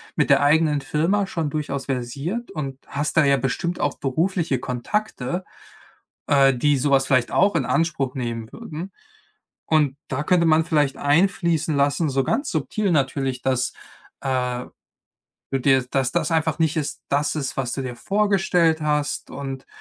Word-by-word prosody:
mit - - +1
der - - +5
eigenen 150 0 +3
Firma 165 +9 0
schon 165 -5 -2
durchaus 140 -2 -3
versiert 140 - -3
und 135 -4 -5
hast 145 +2 -3
da - - +6
ja 140 0 +5
bestimmt 135 +7 -2
auch 145 - 0
berufliche 160 0 0
Kontakte, 135 - -3 0.8
äh, 135 -2 +5
die 145 +3 +2
so 140 +2 0
was 135 -1 +3
vielleicht 130 -3 +2
auch 200 -2 +3
in 145 -6 +1
Anspruch 140 -6 0
nehmen 115 -3 -4
würden. 185 -4 -7 0.7
Und 150 -4 +2
da 140 +3 -2
könnte 175 0 +3
man 160 0 +4
vielleicht 145 -5 +1
einfließen 165 0 +2
lassen, 145 +3 +2
so 135 0 +1
ganz 280 - -1
subtil 185 +6 -1
natürlich, 135 -3 0
dass, 130 -1 0 0.5
äh, 125 -1 -1 0.9
du 135 - 0
dir 130 -1 +3
dass 135 -2 0
das 170 -3 0
einfach 160 -1 +1
nicht 160 -1 +1
ist 150 - -4
das 145 +2 +1
ist, 140 -3 -3
was 125 -2 -1
du 135 - -3
dir 125 -2 -5
vorgestellt 190 - +2
hast 150 -1 -1
und 135 -1 -6
145 Hz, 160 wpm, -23 LUFS, 135-165 Hz, 0.9 s, da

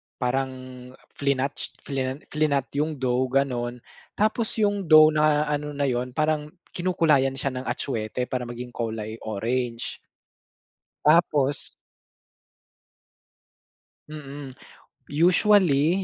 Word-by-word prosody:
parang 130 +1 -1 0.6
flinat 140 -1 0 0.3
flin 135 0 -3
flinat 145 -3 +1
'yung 155 +1 0
dough 130 -1 0
gano'n. 125 -2 -1 0.3
Tapos 215 +2 0
'yung 205 -4 0
dough 155 0 +8
na 150 -1 +3
ano 150 0 -2
na 140 - -1
'yun, 125 0 -2
parang 155 -1 0 0.2
kinukulayan 155 -7 +2
siya 135 0 -2
ng 130 - -8
atsuete 115 -1 -2
para 125 -2 -2
maging 120 +1 -7
kulay 110 -2 -4
orange. 115 +3 -2 1.1
Tapos 150 -3 +3 2.4
Mm, 145 -3 -8 0.5
usually 175 0 +3
140 Hz, 95 wpm, -25 LUFS, 125-155 Hz, 2.4 s, dough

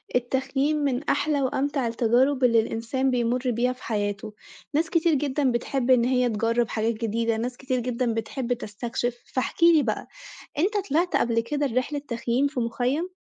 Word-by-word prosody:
التخييم 270 +4 0
من 280 -2 0
أحلى 295 -2 +1
وأمتع 270 0 0
التجارب 245 +4 +2
اللي 230 -2 +5
الإنسان 230 +4 -1
بيمُر 245 +1 0
بيها 245 +2 +1
في 255 - -17
حياته، 205 -1 -3 0.4
ناس 320 +3 +1
كتير 335 -1 +2
جدًا 280 -1 +1
بتحب 245 +2 0
إن 240 -2 +5
هي 250 -1 +2
تجرب 230 +1 0
حاجات 225 +1 0
جديدة، 230 0 -1
ناس 245 +2 -3
كتير 255 -1 -1
جدًا 245 -1 -1
بتحب 235 +3 -2
تستكشف، 240 +2 -4 0.2
فاحكِ 260 +5 -1
لي 335 -3 +6
بقى - - -2 0.5
أنت 405 +7 +2
طلعت 335 +5 +1
قبل 230 -1 +2
كده 285 +5 -1
رحلة 255 +3 -1
تخييم 235 +3 0
في 280 -3 -4
مخيم؟ 250 +9 -1
250 Hz, 165 wpm, -25 LUFS, 230-275 Hz, 0.5 s, لي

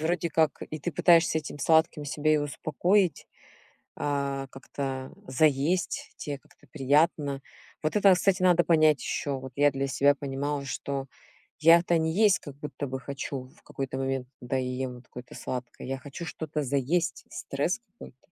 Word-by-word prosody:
вроде 170 +1 0
как 155 -3 +2
и 155 - -5
ты 170 +3 -4
пытаешься 165 +1 +4
этим 150 -1 -7
сладким 160 -1 +3
себя 155 +2 +1
и - - +4
успокоить, 155 +5 +1 0.7
а 140 -1 -1
как-то 135 -1 -5
заесть, 150 +6 +1
те 145 -2 -5
как-то - - -25
приятно. 145 -1 +2 0.4
Вот 155 - -1
это, 200 -2 +6
кстати, 185 +1 +1
надо 175 -2 +5
понять 155 -3 +4
ещё. 140 -2 -2
Вот 130 0 -9
я 145 0 +5
для 135 0 -2
себя 140 +1 +3
понимала, 140 +1 -3
что 135 +1 -4 0.5
я-то 170 +1 +6
не 160 0 0
есть 205 0 +4
как 140 -2 -10
будто 150 0 -5
бы 130 0 -4
хочу 135 -1 -5
в - - -24
какой-то 135 -1 -5
момент, 135 -1 -2
когда 125 +2 -2
я 130 -1 -1
ем 130 0 -3
вот 120 - -14
какое-то 125 0 -11
сладкое, 125 -1 -6
я 135 +1 -3
хочу 145 +5 -8
что-то 155 -2 -4
заесть, 140 +6 0
стресс 145 - -2
какой-то. 230 - -15
145 Hz, 165 wpm, -28 LUFS, 135-160 Hz, 0.7 s, это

